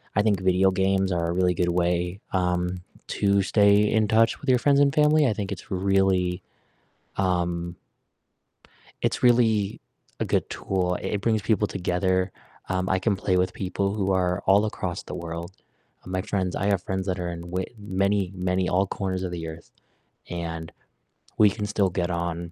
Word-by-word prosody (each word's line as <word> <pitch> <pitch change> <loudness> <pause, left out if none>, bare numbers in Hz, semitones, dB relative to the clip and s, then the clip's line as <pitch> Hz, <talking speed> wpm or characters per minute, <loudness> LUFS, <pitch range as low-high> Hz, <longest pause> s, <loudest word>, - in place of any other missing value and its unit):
I 100 - +4
think 105 -2 +2
video 95 +1 +4
games 95 0 +1
are 85 -1 0
a - - -1
really 90 0 +2
good 90 +1 +1
way, 90 +2 0
um, 90 -1 0 0.2
to 100 -1 +2
stay 100 +1 +4
in 110 -1 +2
touch 115 +2 +3
with 145 - -10
your 125 -1 +5
friends 140 +3 +3
and 140 -1 +4
family, 150 0 +4
I 115 - +1
think 100 -2 -4
it's 100 +1 -8
really, 95 -1 +1 0.7
um 85 -2 -1 1.3
It's - - 0
really 110 -5 +3 0.4
a - - +1
good - - 0
tool, 90 -2 -1
i - - -4
it 105 - -1
brings 110 0 +1
people 105 0 +1
together, 95 0 0 0.4
um, 95 0 -1
I 95 - +2
can 100 0 +1
play 95 -1 0
with 90 0 +1
people 100 +1 -2
who 100 -2 0
are 90 -1 +1
all 100 +2 +5
across 90 -4 -3
the - - -8
world. 85 +1 -6 0.6
My 95 0 -2
friends 95 -3 -2
I 100 - -1
have 100 -3 +1
friends 95 0 -3
that 95 -1 -1
are 90 - -3
in 85 -1 -6
w 90 +2 -3
many, 100 -1 0
many 90 0 0
all 95 +2 +2
corners 95 -1 -3
of 90 - -4
the 85 -2 -5
Earth, 80 +1 -10 0.6
and 85 -1 -5 0.7
we 105 - +6
can 105 +1 -4
still 100 -2 +1
get 90 0 -2
on 85 0 -3
95 Hz, 180 wpm, -25 LUFS, 90-100 Hz, 1.3 s, we